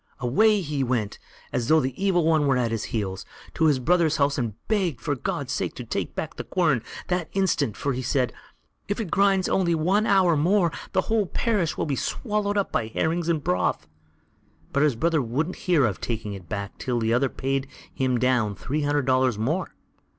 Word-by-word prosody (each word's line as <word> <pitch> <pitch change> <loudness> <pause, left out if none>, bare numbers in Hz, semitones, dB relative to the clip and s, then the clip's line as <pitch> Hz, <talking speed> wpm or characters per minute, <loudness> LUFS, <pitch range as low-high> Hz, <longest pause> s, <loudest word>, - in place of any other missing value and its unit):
Away 205 - +3
he 145 -4 -2
went, 120 -5 -1 0.3
as 120 -2 -1
though 160 +2 +5
the 130 -2 -1
Evil 180 -4 +3
One 155 -3 +3
were 135 -2 +3
at 120 -2 0
his 115 -2 -2
heels, 95 -5 -3 0.3
to 160 - +1
his 150 -4 +4
brother's 160 +4 +2
house, 140 0 +2
and 115 -4 -2
begged 190 - 0
him - - -21
for 145 - 0
God's 125 - -3
sake - - -2
to - - -6
take - - -4
back - - -4
the - - -4
quern 155 -10 +1 0.3
that 180 -3 -1
instant; 155 - +1
for, 140 - -1
said 125 0 0
he: - - -24 0.6
"If - - -10
it 205 -8 -4
grinds 195 -2 +3
only 175 -3 +2
one 190 +7 +2
hour 185 -4 +4
more, 175 +3 +3 0.2
the 190 - +3
whole 215 -1 0
parish 205 -8 0
will - - 0
be 145 -3 -1
swallowed 210 - -1
up 200 - 0
by 110 - 0
herrings 165 +8 -1
and 160 -4 0
broth." 90 -4 0 0.9
But 140 - +2
his 150 -4 +3
brother 160 +4 +1
wouldn't 140 +9 -2
hear 155 -7 +5
of 105 -6 -2
taking 110 -3 -3
it 90 -4 -10
back 100 -2 -5
till 125 -2 -1
the 115 0 +1
other 130 +2 +2
paid 135 +1 -2 0.3
him 130 -2 0
down 120 -5 +1
three 145 +10 -3
hundred 145 -1 +1
dollars 130 -3 +2
more. 150 - -2
145 Hz, 205 wpm, -25 LUFS, 125-175 Hz, 0.9 s, though